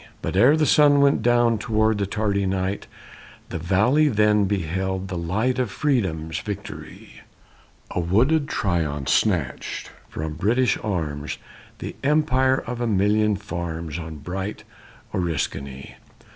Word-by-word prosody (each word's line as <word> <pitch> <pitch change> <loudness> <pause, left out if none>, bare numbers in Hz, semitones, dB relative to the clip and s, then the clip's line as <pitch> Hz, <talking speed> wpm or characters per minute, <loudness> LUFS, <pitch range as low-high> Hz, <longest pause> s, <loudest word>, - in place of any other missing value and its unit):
But - - -2
ere 130 +10 +6
the 155 - +3
sun 145 -1 +5
went 140 -5 +3
toward 110 -2 +2
the 100 - 0
tardy 100 -1 0
night, 95 +1 -2 0.6
The 85 - -4
valley 105 - +3
then 105 -4 +3
beheld 95 0 -2
the 90 - -4
light 105 +10 0
Of 125 -3 0
freedom's 95 - -1
victory; 105 -3 -8 0.7
And 85 -1 -1
wooded 140 - +3
Tryon 80 - -1
snatched 85 - 0 0.2
from 80 0 -4
British 120 +9 +2
arms 75 -8 -3 0.4
The - - -6
empire 135 -3 +3
of 120 0 -5
a 120 - 0
million 105 +1 +2
farms 85 -4 -5
On 80 -1 -7
bright 95 +7 -5 0.5
Oriskany. 70 -6 -3
100 Hz, 125 wpm, -23 LUFS, 85-120 Hz, 0.7 s, ere